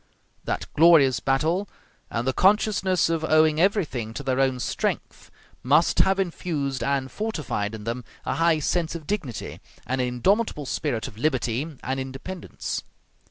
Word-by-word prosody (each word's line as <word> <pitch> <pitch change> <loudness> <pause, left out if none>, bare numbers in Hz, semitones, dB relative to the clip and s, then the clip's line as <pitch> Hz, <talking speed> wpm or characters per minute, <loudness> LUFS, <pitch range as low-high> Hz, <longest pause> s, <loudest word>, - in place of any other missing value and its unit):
That - - -2
glorious 155 -6 +6
battle, 160 +9 0 0.4
and 120 +2 -2
the 130 - +2
consciousness 190 -2 +3
of 165 -1 -1
owing 155 0 +4
everything 150 - 0
to - - -5
their 130 0 0
own 130 -2 +2
strength, - - -3 0.3
must 150 +6 +3
have 190 0 +4
infused 155 -7 -2
and 135 -1 -1
fortified 150 - -3
in 105 - -9
them 120 +3 -3 0.2
a - - 0
high 165 -1 +4
sense 165 +2 -1
of 160 -3 -7
dignity 145 - -4 0.3
and 130 +2 -1
an 125 - 0
indomitable 150 - +1
spirit 120 -1 -2
of 105 - -11
liberty 135 +1 -1
and 130 +1 -2
independence. 135 +7 -5
150 Hz, 150 wpm, -25 LUFS, 130-170 Hz, 0.4 s, glorious